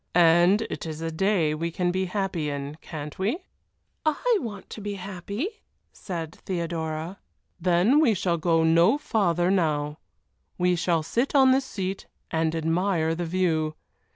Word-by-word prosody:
"And 175 +5 +5
it 170 - -5
is 155 -1 -5
a 165 - -2
day 170 -2 +1
we 165 +2 -2
can 175 +1 0
be 190 +1 0
happy 185 -5 -2
in, 140 +1 -4
can't 150 0 -7
we?" 210 - 0 0.7
"I 440 +10 +2
want 205 -4 -7
to 215 - -7
be 205 0 -4
happy," 200 - -5 0.3
said 165 -4 -6
Theodora. 165 -1 -3 0.4
"Then 180 - +4
we 240 -9 +4
shall 170 -1 0
go 165 0 +2
no 170 - +5
farther 180 - +1
now; 150 -5 0 0.6
we 180 0 +2
shall 170 -1 +1
sit 240 - -1
on 265 -2 +7
this 265 +1 +2
seat 190 -5 -4 0.2
and 160 0 0
admire 165 0 +1
the 170 +1 -3
view. 160 -3 0
175 Hz, 155 wpm, -26 LUFS, 160-200 Hz, 0.7 s, on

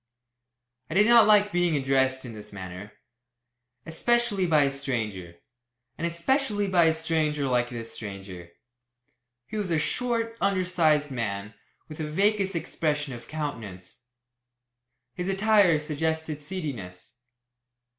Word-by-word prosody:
I 155 - -5
did 205 +2 +6
not 235 -1 +7
like 210 -1 +5
being 175 -3 +1
addressed 130 -1 +1
in 120 - -8
this 105 -1 -10
manner, 95 +1 -8 0.9
especially 205 +2 +1
by 155 -3 +4
a 140 - +1
stranger, 110 -11 -4 0.6
and 170 - -2
especially 205 - 0
by 180 -3 +4
a 160 - +4
stranger 155 -3 0
like 125 -2 +1
this 115 -2 -6
stranger. 95 -4 -8 1.0
He 215 - -6
was 205 -3 -2
a 165 - +2
short, 230 +6 -1
undersized 175 -6 +2
man, 105 -4 -4 0.3
with 155 0 -10
a 155 - -2
vacuous 195 +3 +1
expression 150 -4 -2
of 120 -1 -10
countenance. 115 -11 -6 1.1
His 180 +1 -3
attire 195 -3 +4
suggested 155 0 -3
seediness. 135 - -6
155 Hz, 125 wpm, -26 LUFS, 120-185 Hz, 1.1 s, not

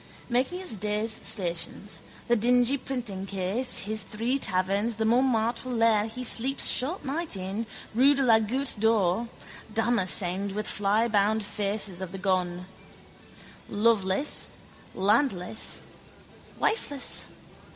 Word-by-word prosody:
Making 260 +10 0
his 240 - -2
day's 210 +2 -1
stations, 195 0 -2 0.3
the 240 - +4
dingy 245 +3 +3
printingcase, 205 -3 -2
his 215 +2 -2
three 235 +6 -2
taverns, 200 +3 +1
the 220 +1 -1
Montmartre 240 0 +1
lair 225 -3 +3
he 245 +3 -6
sleeps 255 +3 +2
short 295 +9 +2
night 310 0 -2
in, 195 +4 -4 0.3
rue 270 +5 +5
de 275 - +1
la 225 -3 +5
Goutte 240 +2 -1
d'Or, 220 -1 +2 0.4
damascened 200 -4 +1
with 210 +1 -3
flyblown 210 +1 +2
faces 205 -2 -2
of 185 -1 -6
the - - -4
gone. 180 -2 -1 1.0
Loveless, 210 +3 +1 0.5
landless, 205 -1 +1 0.7
wifeless. 290 - 0
220 Hz, 110 wpm, -27 LUFS, 195-245 Hz, 1.0 s, rue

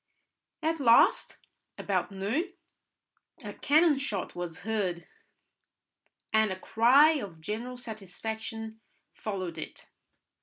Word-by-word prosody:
At 325 +1 0
last, 235 -4 +4 0.4
about - - -1
noon, 215 - -1 0.9
a - - -6
cannon 305 0 +3
shot 210 -9 -3
was 175 -1 -6
heard, 190 -5 -2 1.3
and 220 -2 +4
a 185 - -5
cry 260 +10 +5
of 190 -8 -8
general 230 +9 -5
satisfaction 220 0 -6 0.3
followed 185 -5 -5
it. - - -9
220 Hz, 100 wpm, -29 LUFS, 190-250 Hz, 1.3 s, cry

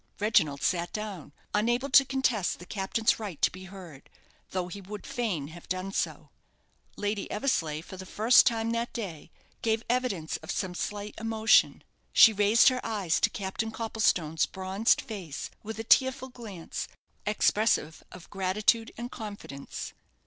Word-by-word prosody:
Reginald 160 -10 +2
sat 175 -1 0
down, 205 -8 -6 0.2
unable 240 +6 +1
to 275 - +8
contest 260 -7 0
the 180 - -11
captain's 215 +5 0
right 200 -8 -6
to - - +5
be 185 +1 -10
heard, 180 -7 -12 0.4
though 185 -1 -2
he 200 +3 -8
would 205 +2 -8
fain 185 -13 -2
have 170 +1 -13
done 185 +1 -2
so. - - -3 0.7
Lady 205 0 -2
Eversleigh 165 - -1
for 190 - -10
the 185 - -8
first 225 +6 +5
time 230 -2 +1
that 235 +1 -2
day 190 -10 -6 0.3
gave 225 0 0
evidence 235 -10 -1
of 160 - -14
some 190 -2 -2
slight 205 +3 -4
emotion. 220 -1 +3 0.3
She 225 - +8
raised 210 +5 +5
her 255 -1 -3
eyes 200 -7 0
to - - +3
Captain 200 +3 -3
Copplestone's 215 -8 0
bronzed 190 +3 +1
face 185 -10 -6
with 220 +1 -7
a 225 - -4
tearful 260 +3 +3
glance, 215 -9 -7 0.4
expressive 210 -6 +1
of 180 -2 -12
gratitude 205 +4 +1
and 240 +1 -6
confidence. 205 - -7
205 Hz, 150 wpm, -28 LUFS, 185-225 Hz, 0.7 s, to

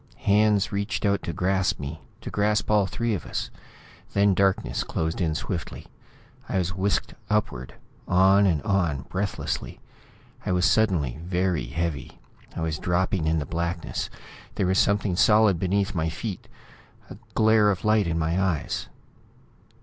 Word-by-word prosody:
Hands 105 0 +3
reached 100 -2 -2
out 100 0 +2
to - - -4
grasp 95 +3 0
me; 75 +2 -6 0.2
to - - -7
grasp 105 0 +1
all 105 -2 +4
three 115 +3 -1
of 100 - -3
us. - - -4 0.6
Then 100 0 +4
darkness 95 +1 +1
closed 80 +3 -2
in 80 -3 0
swiftly; - - -5 0.6
I - - 0
was 90 0 0
whisked 95 +2 -1 0.2
upward, 105 - -1 0.3
on 95 +2 +5
and 80 -6 +1
on, 85 -9 0
breathlessly. 95 +1 -3 0.6
I - - -1
was 90 +1 +2
suddenly 85 - +2
very 90 -3 -1
heavy; 80 +1 -4 0.4
I - - -4
was 80 -1 -2
dropping 90 -1 0
in 80 +1 +2
the 75 - -2
blackness... 85 +2 -3 0.5
there 95 - 0
was 95 +1 +2
something 100 -2 +2
solid 105 -2 +4
beneath 95 +2 0
my 80 -2 0
feet... 95 +3 -6 0.6
a - - -8 0.2
glare 110 -1 +5
of 100 +1 -2
light 105 -3 +3
in 85 0 -1
my 85 +3 0
eyes. 85 -6 -1
95 Hz, 150 wpm, -25 LUFS, 85-100 Hz, 0.6 s, on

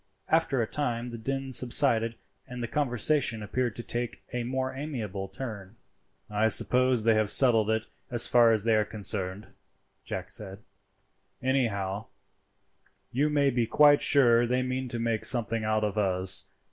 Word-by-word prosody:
After 160 -5 +1
a 115 - +1
time 120 -2 -3
the 115 - -7
din 135 +3 -4
subsided 120 -3 +3 0.3
and 125 -1 -7
the - - -3
conversation 125 -3 0
appeared 120 +2 -2
to 120 - -7
take 120 0 -5
a 125 -1 -2
more 130 +2 -3
amiable 115 -9 -5
turn. 105 -2 -8 0.5
"I 105 +1 +1
suppose 125 +1 +3
they 115 0 +4
have 110 -1 +1
settled 115 -5 +4
it 110 0 0 0.2
as 120 -3 +4
far 120 -2 +4
as 110 -2 0
they 115 0 +2
are 110 - +3
concerned," 100 -1 -5 0.5
Jack - - -6
said; 95 -2 -3 0.8
"anyhow, 110 -6 -1 1.1
you 145 +5 +1
may 145 -2 +2
be 120 -2 0
quite 145 +2 +5
sure 120 -4 +4
they 125 +1 0
mean 130 0 -3
to 120 - -4
make 115 -1 -2
something 115 -3 0
out 110 0 0
of 105 0 -1
us. 95 -2 +1
115 Hz, 160 wpm, -27 LUFS, 110-130 Hz, 1.1 s, quite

